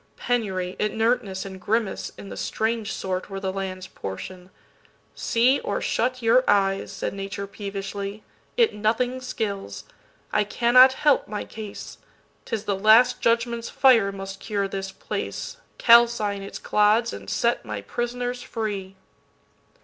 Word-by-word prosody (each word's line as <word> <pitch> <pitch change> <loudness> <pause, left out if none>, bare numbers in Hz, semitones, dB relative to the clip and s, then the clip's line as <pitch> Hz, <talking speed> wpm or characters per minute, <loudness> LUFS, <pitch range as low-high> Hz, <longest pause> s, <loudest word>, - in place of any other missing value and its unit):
penury, 190 -7 -1
inertness 210 -2 0
and 190 -1 -8
grimace, 220 +1 -1
In 100 -1 -9
the 95 - -7
strange 220 - -2
sort, 185 0 -3
were 195 -1 -5
the 190 -1 -3
land's 190 -1 -4
portion. 180 - -8 0.7
"SeeOr 250 +4 +2
shut 255 +1 -1
your 235 +3 +5
eyes," 195 -1 +2
said 195 - -4
Nature 195 0 -5
peevishly,"It 200 - -3
nothing 235 +5 0
skills: 200 - -4 0.5
I 210 - +3
cannot 250 +5 +6
help 295 +1 +2
my 210 0 -4
case:'T 215 -2 -11
is 215 -2 -1
the 205 -2 0
Last 225 +5 +5
Judgment's 235 0 +1
fire 230 -7 +4
must 195 0 -7
cure 200 -2 -2
this 195 0 -5
place, 340 - -5 0.2
Calcine 230 -4 +5
its 195 - -7
clods 215 +3 +2
and - - -8
set 235 0 +1
my 105 -3 -5
prisoners 245 - -3
free." 200 -5 -4
210 Hz, 130 wpm, -24 LUFS, 195-235 Hz, 0.7 s, cannot